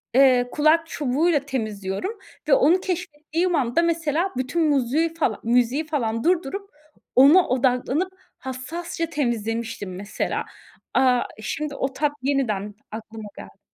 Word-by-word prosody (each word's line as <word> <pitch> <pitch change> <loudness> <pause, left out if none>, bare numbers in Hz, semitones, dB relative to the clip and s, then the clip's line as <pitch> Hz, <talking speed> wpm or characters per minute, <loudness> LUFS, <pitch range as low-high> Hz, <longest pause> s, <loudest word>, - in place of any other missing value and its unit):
eee, 255 -2 +5
kulak 315 +2 +3
çubuğuyla 295 +3 +1
temizliyorum 225 - -4 0.3
ve - - +4
onu 375 -8 +5
keşfettiğim 345 -1 -2
anda, 265 +2 +2
mesela, 335 +1 0
bütün 260 +6 -1
muzüğü 290 +4 +1
fala 300 -10 -1
müziği 245 +6 +2
falan 230 -7 -1
durdurup, 365 +3 0 0.5
ona 290 +8 +7
odaklanıp, 260 +8 +1 0.2
hassasça 330 +7 -4
temizlemiştim 230 - -3
mesela. 200 +2 -3 0.5
Aaa, 250 -2 +4 0.2
şimdi 295 +5 -3
o 270 0 -2
tat 295 +1 0
yeniden 220 -7 -1 0.2
aklıma 220 -1 -8
geldi. - - -11
275 Hz, 120 wpm, -23 LUFS, 240-330 Hz, 0.5 s, ona